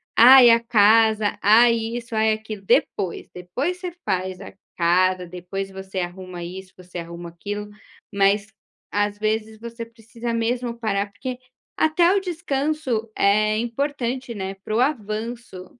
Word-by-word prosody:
ai 250 +1 +9
a 230 0 +6
casa, 220 -1 +4
ai 230 +3 +6
isso, 230 0 -4
ai 220 0 +3
aquilo. 215 -2 -7
Depois, 185 -2 0
depois 255 - -3
você 360 -1 -5
faz 185 0 -2
a 195 - -10 0.2
casa, 180 +1 +2
depois 180 +2 -6
você 190 0 -6
arruma 180 0 -6
isso, 185 +2 -9
você 180 -1 -9
arruma 170 +1 -8
aquilo, 205 +5 -6 0.4
mas 200 +1 +2 0.4
às 205 0 0
vezes 215 0 -2
você 230 0 -7
precisa 230 +1 -7
mesmo 235 +1 -1
parar, 200 -3 -1
porque 250 +4 -6 0.4
até 340 +3 +3
o - - +3
descanso 295 - -2
é 215 +2 +3
importante, 255 +1 -3
né, 195 -1 -5
para 215 - -3
o - - +2
avanço. 230 -5 -3
215 Hz, 140 wpm, -22 LUFS, 190-235 Hz, 0.4 s, ai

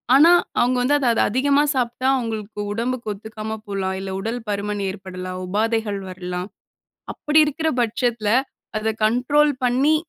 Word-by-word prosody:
ஆனா, 325 +5 +7 0.3
அவுங்க 250 +1 +2
வந்து 285 +4 +3
அத 260 - 0
அத - - +1
அதிகமா 280 +5 +3
சாப்பிட்டா, 250 +1 -1
அவுங்களுக்கு 220 -3 -5
உடம்புக்கு 230 0 -2
ஒத்துக்காம 220 +1 -6
போலாம், 190 -1 -2
இல்ல 190 0 -5
உடல் 225 +4 -3
பருமன் 205 0 -2
ஏற்படலாம், 185 -1 -6
உபாதைகள் 215 0 0
வரலாம். 180 0 -5 0.7
அப்பிடி 300 +1 +2
இருக்கிற 315 +2 -1
பட்சத்தில 235 -2 0 0.5
அத 215 +1 -1 0.2
கண்ட்ரோல் 280 +6 +3
பண்ணி 260 +5 +3
225 Hz, 135 wpm, -22 LUFS, 200-255 Hz, 0.7 s, ஆனா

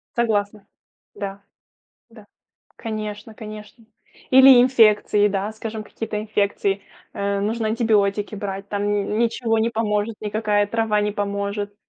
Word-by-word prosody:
Согласна, 210 -3 -1 0.5
да, 200 0 -6 0.7
да. 220 -3 -16 0.5
Конечно, 215 -1 -6
конечно. 215 +1 -11 0.5
Или 265 -1 +8
инфекции, 215 -4 +4
да, 200 +1 -2
скажем, 220 0 -6
какие-то 215 0 -5
инфекции, 205 -2 -1 0.3
э, 200 0 -1
нужно 220 +2 -1
антибиотики 215 -2 +1
брать, 195 -1 -5
там 205 0 -2
н 205 0 -1
ничего 230 -1 +1
не 225 +1 +1
поможет, 220 -1 -1
никакая 210 -1 0
трава 220 -1 0
не 210 0 0
поможет. 200 0 -3
210 Hz, 120 wpm, -22 LUFS, 205-225 Hz, 0.7 s, Или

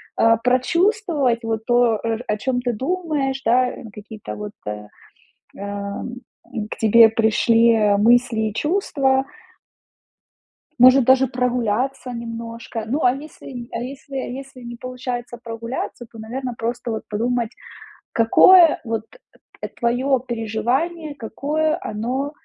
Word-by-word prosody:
а, 230 -1 +4
прочувствовать 275 - +1
вот 225 -1 -3
то, 240 -3 +3 0.3
о 210 - 0
чем 250 +2 -1
ты 245 -1 -1
думаешь, 280 -1 -2
да, 250 +2 +2
ну 230 - -10
какие-то 210 +1 -9
вот, 210 0 -6 0.2
э, 105 0 -5 0.7
ам, 200 +3 -5 0.6
к - - -5
тебе 225 +1 +6
пришли 225 +1 +3 0.2
мысли 240 +1 +3
и 205 - -8
чувства. 275 - +1 1.6
Может, 255 +1 +7
даже 260 +2 +5
прогуляться 250 +1 -1
немножко. 230 -1 -6
Ну, 280 +7 -1
а 245 - +5
если 270 -4 -9
а 230 - -4
если 270 +2 -8
если 265 0 -6
не 240 0 -8
получается 250 -1 -5
прогуляться, 235 +1 -6
то, 225 - -13
наверно, 245 +3 -5
просто 235 +1 -3
вот 220 -1 -3
подумать, 235 +2 -1 0.6
какое 330 +9 +6
вот, 225 -1 -2 0.6
э, - - -3
твоё 250 +3 0
переживание, 250 +8 -2
какое 300 +7 -1
оно, 250 +7 -3
245 Hz, 120 wpm, -21 LUFS, 225-265 Hz, 1.6 s, Может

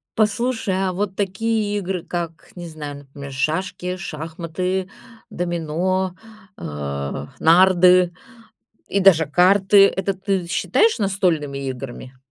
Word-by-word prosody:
Послушай, 225 -1 0
а 190 -1 0
вот 190 0 -3
такие 205 +1 -1
игры, 185 -3 -3
как, 170 -2 -5
не 175 -1 -7
знаю, 150 -3 -7
например, 140 0 -10
шашки, 180 +6 -2
шахматы, 180 +3 -4 0.4
домино, 175 +2 -2 0.4
а, 70 -1 -5
нарды 180 +1 +5 0.7
и 200 - 0
даже 175 -5 +5
карты- 195 +5 +5
это 195 +1 -1
ты 190 -2 -2
считаешь 445 - +2
настольными 180 -9 0
играми? 130 0 -8
180 Hz, 105 wpm, -21 LUFS, 155-195 Hz, 0.7 s, нарды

